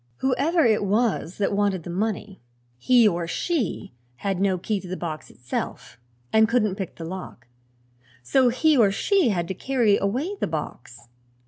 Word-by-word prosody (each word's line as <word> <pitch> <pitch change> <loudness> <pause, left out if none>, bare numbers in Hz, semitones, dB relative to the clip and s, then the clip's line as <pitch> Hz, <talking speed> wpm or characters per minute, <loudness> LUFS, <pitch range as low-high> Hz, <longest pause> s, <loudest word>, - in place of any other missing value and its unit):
Whoever 280 +5 +1
it 220 -3 +3
was 205 -3 0
that 200 -1 0
wanted 200 -3 0
the 175 - -6
money, 205 +1 -3 0.4
he 240 - +5
or 170 -3 -1
she 250 - -2 0.2
had 195 +7 -2
no 195 -2 +2
key 205 +3 -2
to 185 - -10
the 185 +1 -4
box 155 -3 -6
itself 125 -1 -6 0.3
and 220 0 +5
couldn't 220 -4 +2
pick 190 -3 -6
the 165 - -7
lock; 175 -8 -8 0.8
so 255 - +3
he 305 +6 +3
or 225 -6 +5
she 375 - +2
had 175 -5 -1
to 190 - -3
carry 235 -1 +2
away 260 - -2
the - - 0
box. 125 -6 -7
200 Hz, 165 wpm, -24 LUFS, 175-245 Hz, 0.8 s, he